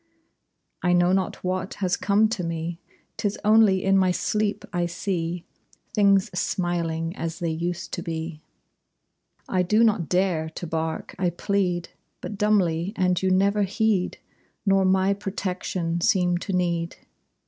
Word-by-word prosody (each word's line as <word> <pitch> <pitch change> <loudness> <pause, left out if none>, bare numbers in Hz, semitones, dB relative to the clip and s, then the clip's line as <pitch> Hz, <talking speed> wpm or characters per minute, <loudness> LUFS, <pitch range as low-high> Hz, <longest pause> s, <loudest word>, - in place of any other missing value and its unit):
I 180 -1 +2
know 175 0 +4
not 190 0 -1
what 185 +1 -2
has 185 -3 0
come 210 +2 +3
to 205 -5 -2
me. 165 0 -3 0.4
'Tis 205 0 -1
only 210 -3 +5
in 195 0 +3
my 185 -1 +3
sleep 210 +3 -1
I 175 -1 +1
see 175 -1 -3 0.5
Things 200 -1 +4
smiling 170 -2 -1
as 165 0 -4
they 170 -2 -2
used 170 +3 -3
to 175 - -2
be. 160 -1 -5 1.1
I 185 - +1
do 210 +6 +3
not 210 -7 +2
dare 180 -4 +1
to 160 - -7
bark; 160 0 -3
I 180 -2 +2
plead 180 -1 -1 0.3
But 210 - -6
dumbly, 195 -3 +2
and 180 -2 +1
you 190 - +2
never 200 +2 +3
heed; 200 -1 +1 0.5
Nor 195 -1 +4
my 190 +1 +3
protection 185 -3 -3
seem 180 -1 +2
to 195 - -5
need. 170 -2 0
180 Hz, 145 wpm, -25 LUFS, 170-195 Hz, 1.1 s, only